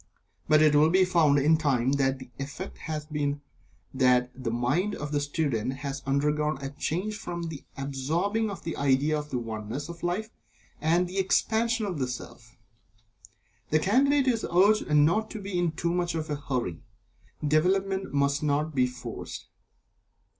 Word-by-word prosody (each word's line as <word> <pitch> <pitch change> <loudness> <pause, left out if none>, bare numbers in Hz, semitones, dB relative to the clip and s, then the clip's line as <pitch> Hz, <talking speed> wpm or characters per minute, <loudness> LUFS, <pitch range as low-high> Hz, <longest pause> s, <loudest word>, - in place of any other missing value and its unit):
But 155 0 +5
it 155 -1 +5
will 150 +2 +5
be 185 +2 +4
found, 165 -5 +4
in 150 +3 +4
time, 135 -5 +1
that 135 -1 +1
the 130 -1 -12
effect 145 +7 -6
has 155 -1 -3
been 145 -2 -2 0.5
that 125 -1 +3
the 130 -2 -4
mind 125 - 0
of 150 0 -5
the 145 - +1
student 145 -5 -1
has 135 0 -5
undergone 150 +2 +1
a 135 0 -5
change 180 +8 -2
from 175 -4 -5
the 150 -4 -8
absorbing 160 +11 -1
of 195 -4 -7
the 165 - -4
idea 140 +2 +2
of 150 0 -4
the 130 - -2
Oneness 115 +5 -5
of 170 -1 -9
Life, 190 +6 -2 0.5
and 170 +4 +3
the 185 +2 -3
Expansion 225 +4 +1
of 180 -7 -3
the 130 - 0
Self. 120 -2 -9 1.1
The 155 - +4
Candidate 270 - +3
is 235 -3 +1
urged 200 +4 +3
not 160 +9 +3
to 220 - -6
be 200 -1 -5
in 175 -2 +1
too 170 +2 -2
much 175 -1 -1
of 155 -1 -3
a - - 0
hurry. 125 - -3 0.7
Development 190 +5 +1
must 140 0 +1
not 150 +1 0
be 130 -2 +3
forced. 125 0 -8
150 Hz, 170 wpm, -27 LUFS, 135-180 Hz, 1.1 s, But